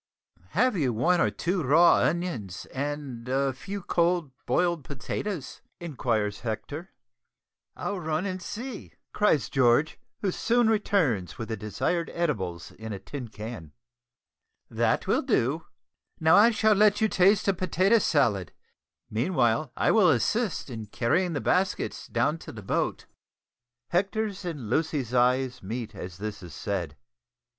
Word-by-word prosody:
"Have 255 -2 +3
you 135 -9 +1
one 175 +11 +2
or - - +3
two 180 +1 -1
raw 160 +5 +6
onions 145 - -1
and 135 -3 -4
a 135 +1 +1
few 195 +9 -7
cold 170 -4 +1 0.2
boiled 170 +3 +1
potatoes?" 145 - -5 0.2
inquires 115 -10 -1
Hector. 135 - -5 0.9
"I'll 200 -2 -3
run 160 +2 -1
and 185 -1 -3
see," 225 +5 -7 0.2
cries 160 - +2
George, 135 +4 +2 0.2
who 195 - +1
soon 235 +3 +2
returns 145 - +1
with 115 - -6
the 110 - -1
desired 110 - -2
edibles 95 - -2
in 110 0 -8
a - - -4
tin 130 +5 -7
can. 105 -7 -8 1.0
"That - - +1
will - - +2
do. 145 +8 0 0.5
Now 160 +1 +5
I 210 +3 +7
shall 220 -1 +3
let 210 0 +4
you 220 - +3
taste 195 +1 +3
a 195 - +4
potato 185 +4 +3
salad; 115 - +1 0.5
meanwhile 120 - +1
I - - +3
will 210 -6 +5
assist 175 - 0
in 110 -3 -6
carrying 165 - +1
the 145 - -2
baskets 185 +1 0
down 165 - 0
to - - -9
the 110 -2 -10
boat." - - -1 0.8
Hector's 200 +2 -1
and 150 -10 -5
Lucy's 140 -1 -1
eyes 125 +1 +2
meet 115 +2 -5
as 90 -2 -8
this 105 0 -5
is 85 -4 -10
said. 85 -8 -3
145 Hz, 140 wpm, -27 LUFS, 115-185 Hz, 1.0 s, I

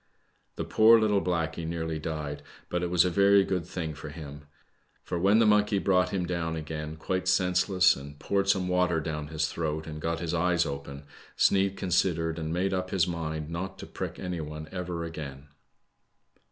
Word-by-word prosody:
The - - -3
poor 115 +1 +6
little 105 -2 +2
blackey 85 -2 -1
nearly 80 -1 -3
died, 75 -2 -4 0.3
but 90 - -1
it 90 - -1
was 90 0 +4
a 90 - +1
very 100 +1 +5
good 90 -3 -2
thing 80 -4 -4
for 75 - -8
him. 75 -2 -9 0.6
Fpr, 85 - -2
when 100 +3 +5
the 115 - +5
monkey 105 -1 +4
brought 90 -2 +2
him 90 -2 -1
down 85 -2 -2
again, 75 0 -5
quite 90 +3 -2
senseless, 90 +1 +3
and 70 +1 -10
poured 100 +5 0
some 95 -2 +2
water 90 -2 +2
down 75 -1 -4
his 80 0 -1
throat 80 -1 -3
and 75 -1 -7
got 85 +1 -1
his 85 -1 -3
eye^ 85 0 +2
open, 70 0 -6 0.3
Sneid 95 0 +3
considered, 85 -2 0
and 80 0 -3
made 95 +3 0
up 95 0 -2
his 95 -2 +2
mind 80 -3 -4
not 95 +3 -4
to - - -8
prick - - -6
any 90 -2 -4
one 75 0 -7
ever 90 -2 -4
again. 75 -3 -7
85 Hz, 185 wpm, -28 LUFS, 80-95 Hz, 0.6 s, poor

